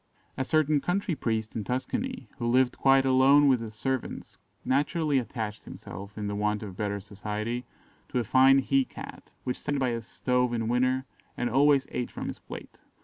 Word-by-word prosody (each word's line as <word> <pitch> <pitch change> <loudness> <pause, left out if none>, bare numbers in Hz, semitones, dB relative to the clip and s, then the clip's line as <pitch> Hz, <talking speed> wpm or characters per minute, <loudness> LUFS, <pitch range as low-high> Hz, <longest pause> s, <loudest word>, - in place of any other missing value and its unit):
A 130 - -1
certain 155 0 +2
country 180 +1 0
priest 110 -6 -2
in 110 - -2
Tuscany, 235 - -3
who 120 - -1
lived 125 +1 +3
quite 135 0 +4
alone 135 +2 +6
with 130 -4 +4
his 110 -1 -7
servants, 130 +2 -4 0.3
naturally 145 +1 +2
attached 110 -3 -5
himself, 100 +4 -9
in 105 - -3
the 100 - -2
want 105 +1 0
of 100 -3 -7
better 100 0 -2
society, 105 +4 -4 0.4
to - - -2
a 120 - +2
fine 130 +4 +6
he 135 0 +3
cat, - - -10
which 125 - -3
sat 145 - -2
by 130 -2 +1
his 115 -1 -4
stove 125 -1 0
in 115 -1 -1
winter, 130 +2 +1 0.3
and 120 -1 -1
always 140 +1 +4
ate 125 - -2
from - - -5
his - - -7
plate. - - -10
125 Hz, 185 wpm, -28 LUFS, 110-135 Hz, 0.4 s, alone